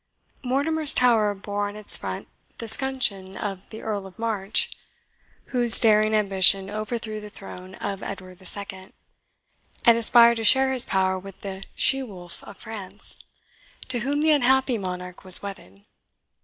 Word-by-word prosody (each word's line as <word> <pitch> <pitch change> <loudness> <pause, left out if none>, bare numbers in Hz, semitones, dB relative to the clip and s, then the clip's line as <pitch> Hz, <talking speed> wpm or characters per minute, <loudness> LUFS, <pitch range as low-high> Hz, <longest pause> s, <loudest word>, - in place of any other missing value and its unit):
Mortimer's 285 +4 +2
Tower 220 -4 +2
bore 205 +1 -5
on 205 - -11
its 215 -1 +2
front - - -6 0.3
the 230 - -8
scutcheon 215 -7 -1
of 195 -2 -7
the 220 - -11
Earl 205 -3 -5
of 185 - -18
March, 215 -3 -1 0.8
whose 240 -2 +8
daring 215 -1 +3
ambition 195 -1 +3
overthrew 215 0 -5
the 210 - -10
throne 185 -2 -12
of 195 -1 -6
Edward 185 -2 -9
II., 190 -1 -6 0.9
and 235 -1 +5
aspired 235 0 +6
to 225 - -4
share 265 +5 +5
his 255 - +4
power 190 -1 0
with 195 0 -14
the 190 -1 -8
"She 270 0 +4
wolf 180 -8 -10
of - - -13
France," 215 -4 -5 0.7
to 250 -2 0
whom 280 +4 -2
the 315 0 +2
unhappy 265 -3 +1
monarch 180 -1 -8
was 185 0 +1
wedded. 100 - -11
210 Hz, 150 wpm, -23 LUFS, 190-235 Hz, 0.9 s, whose